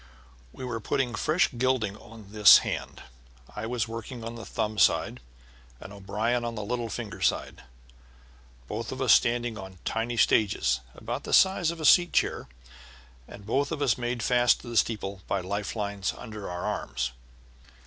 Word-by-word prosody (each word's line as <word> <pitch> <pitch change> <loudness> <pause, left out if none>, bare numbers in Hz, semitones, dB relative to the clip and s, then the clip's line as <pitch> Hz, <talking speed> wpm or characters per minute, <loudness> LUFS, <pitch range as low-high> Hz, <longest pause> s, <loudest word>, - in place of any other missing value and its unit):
We 130 - -8
were 120 -2 -3
putting 120 +3 -1
fresh 155 - +2
gilding 125 -6 +1
on 110 -2 -14
this 105 -1 +9
hand. - - -5 0.5
I 105 +1 -4
was 120 -2 -1
working 115 +1 -7
on 115 +1 -5
the 115 -2 -9
thumb 105 0 -2
side 65 - +2 0.6
and 95 - -10
O'Brien 105 +5 -1
on 115 -1 -4
the 105 -2 -5
little 120 +1 -3
finger - - -6
side, - - -1 1.1
both 110 +6 -5
of 130 - -6
us 130 -7 +5
standing 120 0 +1
on 95 -1 -10
tiny 115 +1 -2
stagings 95 - +2 0.2
about - - -5
the - - -5
size 190 -3 +4
of 170 0 -5
a 155 - -3
chair 175 +2 +3
seat, 60 0 -24 0.6
and 100 - -12
both 140 +7 0
of 160 - -3
us 125 -6 +3
made 120 -2 -3
fast 120 0 +3
to - - -13
the 120 - -2
steeple 100 -4 0
by 100 - 0
life 100 +2 -4
lines 100 -2 -3
under 110 -4 -8
our 90 0 -5
arms. - - -3
115 Hz, 170 wpm, -27 LUFS, 100-125 Hz, 1.1 s, this